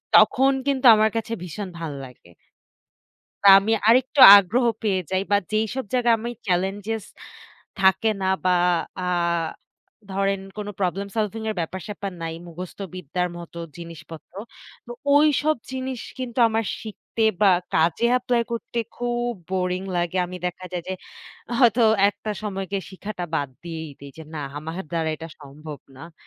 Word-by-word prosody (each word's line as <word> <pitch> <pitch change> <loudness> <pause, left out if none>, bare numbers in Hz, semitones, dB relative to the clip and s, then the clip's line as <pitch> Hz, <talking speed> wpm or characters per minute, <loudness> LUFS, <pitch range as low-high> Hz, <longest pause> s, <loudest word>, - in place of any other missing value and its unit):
তখন 270 +1 +6 0.2
কিন্তু 270 -2 0
আমার 215 0 +3
কাছে 225 0 -3
ভীষণ 180 +4 -6
ভাল 165 -2 -4
লাগে 125 -8 -16 1.2
বা - - +8
আমি 220 +3 0 0.2
আরেকটু 255 +4 +4 0.2
আগ্রহ 205 +6 +2 0.2
পেয়ে 195 -4 +1
যাই 190 0 +1
বা - - +7 0.2
যেইসব 220 +4 -1
জায়গায় 240 -2 +3
আমি 235 +2 -4 0.2
চেলেঞ্জস 195 +4 -1 0.8
থাকে 190 +3 +4
না - - 0 0.2
বা 185 - +3 0.5
আ - - -4 1.1
ধরেন 195 0 0 0.2
কোনো 205 0 -4
প্রবলেম 195 +2 -1
সলভিং 220 0 -1
এর - - -3
ব্যাপার-স্যাপার 195 +3 -5
নাই। 165 0 -4
মুখস্থ 175 +1 -9 0.2
বিদ্যার 180 +1 -2
মতো 170 0 -10 0.2
জিনিসপত্র 165 -2 -11 0.5
তো 240 - -7 0.2
ওইসব 300 +1 +4 0.2
জিনিস 260 -1 -4 0.2
কিন্তু 255 -1 -5
আমার 225 0 0 0.2
শিখতে 220 +1 -4 0.2
বা 205 -2 +6 0.2
কাজে 165 +8 +2
এপ্লাই 245 -1 +1
করতে 235 0 -4 0.2
খুব 240 0 -1 0.2
বোরিং 180 -1 -1
লাগে। 175 +1 -1
আমি 180 +1 -7
দেখা 180 +1 -5
যায় 175 -1 -3
যে, - - -2 0.7
হয়তো 240 -1 +5 0.3
একটা 205 +1 -5
সময় 195 -2 -3
গিয়ে 195 -1 -2
শিখাটা 190 -1 -6
বাদ 145 -3 0 0.2
দিয়েই 160 -2 -6
দেই 140 0 -10
যে, - - -7
না - - -4 0.2
আমার 160 +3 -6
দ্বারা 165 -2 -1
এটা 165 +1 -8
সম্ভব 150 +1 -10 0.2
না। 165 +5 -11
195 Hz, 150 wpm, -23 LUFS, 175-225 Hz, 1.2 s, বা